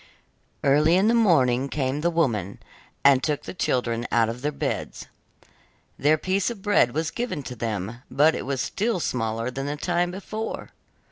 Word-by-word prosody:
Early 150 +4 +4
in 195 +4 +4
the - - +3
morning 140 - +3
came 135 0 -1
the 170 - +2
woman, 115 - 0 0.5
and 140 -2 +6
took 145 +3 -1
the - - -7
children 120 -8 -1
out 115 -1 +3
of 120 +2 -6
their 150 +2 -1
beds. - - -4 0.9
Their 150 +2 +4
piece 185 +5 0
of 220 -5 -8
bread 205 - +3
was 160 +1 -1
given 235 - -3
to 125 - -7
them, 110 0 -4
but 150 +5 +4
it - - -5
was 135 -2 -1
still 220 -1 -1
smaller 115 -4 -2
than 135 +2 -4
the 145 - -2
time 175 +2 0
before. 210 +4 -6
145 Hz, 175 wpm, -25 LUFS, 125-175 Hz, 0.9 s, and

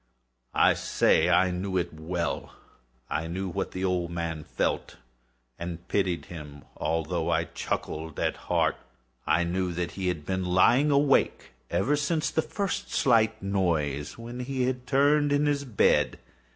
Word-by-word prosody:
I - - +5
say 80 +2 +2
I 90 +1 +4
knew 95 +1 -2
it 85 -2 -1
well. 85 +2 -3 0.5
I 80 +1 -2
knew 95 +3 -3
what 95 +2 -3
the 95 +1 -3
old 90 -2 0
man 85 -2 -3
felt, - - -2 0.6
and 85 0 -6
pitied 95 -4 0
him, 75 -4 -10
although 80 +1 -1
I - - +2
chuckled 80 -1 -4
at - - 0
heart. - - 0 0.5
I 80 +3 +3
knew 90 +1 -1
that 85 0 -2
he 95 -1 -3
had 80 -5 -2
been 95 -1 -1
lying 105 +11 +4
awake 140 -1 +2 0.2
ever 150 - +2
since 150 +2 0
the 160 - +2
first 200 +3 -3
slight 110 -4 +3
noise, 80 -8 -1
when 120 +1 -7
he 130 +1 -2
had 125 0 -2
turned 145 +2 +3
in 145 +1 +3
the 145 -1 +1
bed. 110 -6 +3
90 Hz, 150 wpm, -27 LUFS, 85-125 Hz, 0.6 s, I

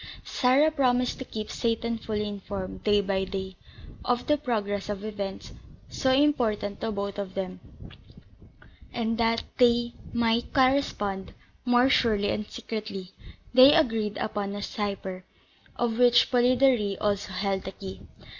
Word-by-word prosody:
Sarah 275 +5 +3
promised 250 -4 +1
to 260 - -5
keep 215 -3 -6
Seyton 230 0 -1
fully 210 -1 -3
informed, 200 -2 -6
day 205 -1 +3
by 195 -1 -1
day, 190 -1 -5 0.5
of 245 -1 0
the 300 - +3
progress 210 -8 -2
of 205 0 -4
events, 200 -3 -6 0.4
so 260 - 0
important 240 -8 +1
to 225 - -1
both 200 -1 -4
of 195 -2 -5
them; 185 -1 -4 1.3
and, 230 -1 -2
that 230 0 +2 0.2
they 240 -1 +4 0.2
might 235 +1 0
correspond 255 -8 +1 0.3
more 245 +1 +4
surely 215 -6 +2
and 210 0 -3
secretly, 210 -4 -6 0.4
they 260 +4 +8
agreed 225 -9 +1
upon 205 -2 -3
a 205 - -5
cipher, 195 -3 -4 0.5
of 235 -1 -1
which 245 -1 +5
Polidori 245 -5 +3
also 205 -2 -1
held 195 0 -1
the 190 - -4
key. 95 - -8
215 Hz, 135 wpm, -27 LUFS, 200-245 Hz, 1.3 s, they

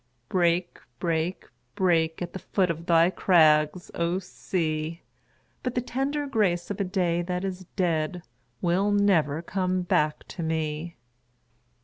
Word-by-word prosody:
Break, 175 -1 +1 0.2
break, 165 +4 -1 0.3
break, 165 -3 +2
At 175 - -7
the 190 - -5
foot 185 -2 +1
of 165 +1 -7
thy 170 +1 +5
crags, 160 -2 +3
O 170 +2 0
sea! 165 -3 -3 0.6
But 250 -1 -3
the 245 - +1
tender 270 +4 -2
grace 205 -9 0
of 200 - -3
a - - +3
day 180 -3 0
that 180 +2 -2
is 185 -1 -5
dead 170 -1 0 0.4
Will 185 +4 +2
never 170 -7 +2
come 185 0 -1
back 150 -3 0
to - - -6
rue. 160 0 -2
175 Hz, 135 wpm, -26 LUFS, 165-190 Hz, 0.6 s, thy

